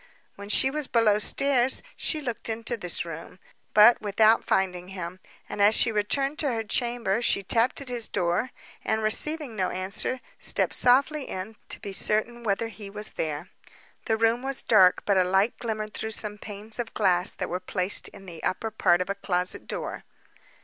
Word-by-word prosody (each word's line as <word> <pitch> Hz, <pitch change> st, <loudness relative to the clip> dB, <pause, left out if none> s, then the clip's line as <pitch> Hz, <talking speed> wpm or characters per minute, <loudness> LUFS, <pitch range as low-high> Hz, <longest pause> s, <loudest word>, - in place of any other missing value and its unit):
When 200 Hz, 0 st, -10 dB
she 265 Hz, +5 st, +4 dB
was 300 Hz, -1 st, -3 dB
below 215 Hz, -3 st, +3 dB
stairs 260 Hz, +2 st, +3 dB
she 310 Hz, -, -1 dB
looked 240 Hz, -5 st, -3 dB
into 225 Hz, +2 st, -2 dB
this 180 Hz, -6 st, +1 dB
room, 165 Hz, +2 st, -9 dB, 0.4 s
but 215 Hz, +3 st, +7 dB
without 215 Hz, +2 st, +3 dB
finding 180 Hz, -2 st, -1 dB
him; 185 Hz, -1 st, -7 dB, 0.3 s
and -, -, -4 dB
as 210 Hz, +2 st, +6 dB
she 230 Hz, -, +4 dB
returned 270 Hz, +8 st, -1 dB
to 285 Hz, -4 st, +1 dB
her 225 Hz, -1 st, -2 dB
chamber, 235 Hz, -1 st, -1 dB
she 200 Hz, -4 st, +1 dB
tapped 230 Hz, +7 st, +2 dB
at 280 Hz, -, -9 dB
his 240 Hz, -3 st, 0 dB
door, 175 Hz, +8 st, -1 dB, 0.3 s
and 220 Hz, 0 st, -1 dB
receiving 285 Hz, +4 st, 0 dB
no 185 Hz, -3 st, -1 dB
answer, 190 Hz, +7 st, -2 dB, 0.2 s
stepped -, -, +1 dB
softly 275 Hz, +4 st, +3 dB
in, 190 Hz, +4 st, -6 dB
to -, -, -2 dB
be 200 Hz, -, -7 dB
certain 220 Hz, +4 st, -1 dB
whether 225 Hz, 0 st, -1 dB
he 205 Hz, -1 st, -10 dB
was 210 Hz, +1 st, -5 dB
there. 155 Hz, +1 st, -4 dB, 0.6 s
The 220 Hz, -, 0 dB
room 230 Hz, +2 st, +2 dB
was 270 Hz, 0 st, -2 dB
dark, 190 Hz, -5 st, +4 dB
but 200 Hz, -2 st, +2 dB
a -, -, +4 dB
light 190 Hz, +5 st, +1 dB
glimmered 215 Hz, -2 st, -4 dB
through 220 Hz, -, -4 dB
some 210 Hz, -1 st, -4 dB
panes 210 Hz, +3 st, -3 dB
of 235 Hz, -, -5 dB
glass 180 Hz, 0 st, +2 dB
that -, -, -4 dB
were 180 Hz, -, -3 dB
placed 185 Hz, +1 st, -2 dB
in 195 Hz, -1 st, -14 dB
the 170 Hz, -3 st, -10 dB
upper 220 Hz, +4 st, -2 dB
part 175 Hz, -4 st, +2 dB
of 180 Hz, -, -4 dB
a -, -, 0 dB
closet 180 Hz, -2 st, -1 dB
door. -, -, -5 dB
215 Hz, 185 wpm, -26 LUFS, 190-235 Hz, 0.6 s, but